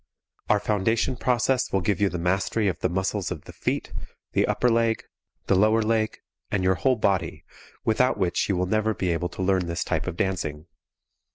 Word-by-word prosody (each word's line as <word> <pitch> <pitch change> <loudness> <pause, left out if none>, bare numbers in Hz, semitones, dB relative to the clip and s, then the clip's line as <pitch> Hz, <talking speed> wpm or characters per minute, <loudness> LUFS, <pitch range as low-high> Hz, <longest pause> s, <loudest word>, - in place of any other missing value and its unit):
Our 105 - +4
foundation 110 +4 0
process 125 +1 +1
will 95 - +1
give 100 +1 0
you 100 - +4
the 90 - -4
mastery 95 +5 0
of 90 -3 -1
the - - 0
muscles 95 +1 -1
of 75 - -6
the - - -12
feet, - - -3 0.4
the - - +2
upper 125 - +1
leg, 115 -1 +2 0.4
the - - +2
lower 110 +3 +4
leg 110 0 0 0.3
and 100 -3 0
your 95 0 +4
whole 130 +7 +2
body, 100 -4 0 0.4
without 125 +3 +2
which 90 -1 0
you 95 - +1
will 90 - +1
never 110 +2 +1
be 90 -2 -1
able 90 +1 -2
to 90 +2 -5
learn 95 -2 +1
this 85 0 -2
type - - -2
of 85 - -4
dancing. 85 -5 -2
100 Hz, 195 wpm, -25 LUFS, 90-110 Hz, 0.4 s, Our